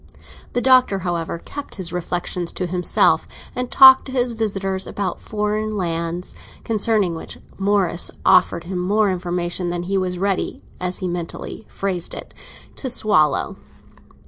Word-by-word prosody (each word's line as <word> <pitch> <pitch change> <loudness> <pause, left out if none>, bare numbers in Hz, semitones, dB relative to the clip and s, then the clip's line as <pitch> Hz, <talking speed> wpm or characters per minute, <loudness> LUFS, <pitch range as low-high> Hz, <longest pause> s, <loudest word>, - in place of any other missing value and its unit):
The 245 - +1
Doctor, 255 -6 +5
however, 170 -1 -2
kept 285 +11 -8
his 180 -3 -3
reflexions 175 0 -3
to 185 - -2
himself, 180 0 +2 0.3
and 250 0 -2
talked 265 -1 +8
to 265 - -8
his 250 -2 +1
visitors 195 -4 -2
about 195 -3 -3
foreign 215 0 -2
lands, 170 -1 -3 0.3
concerning 215 -4 +1
which 160 - -7 0.2
Morris 195 -3 +1 0.2
offered 170 - +4
him 180 +1 -4
more 205 +3 +2
information 175 0 -2
than 175 0 -3
he 195 +2 0
was 180 -1 -2
ready, 195 +1 -1 0.2
as 180 0 -2
he 185 - -3
mentally 175 +4 -5
phrased 185 -3 -3
it, - - -9 0.4
to 260 - -3
swallow. 205 - +2
190 Hz, 145 wpm, -21 LUFS, 175-215 Hz, 0.4 s, talked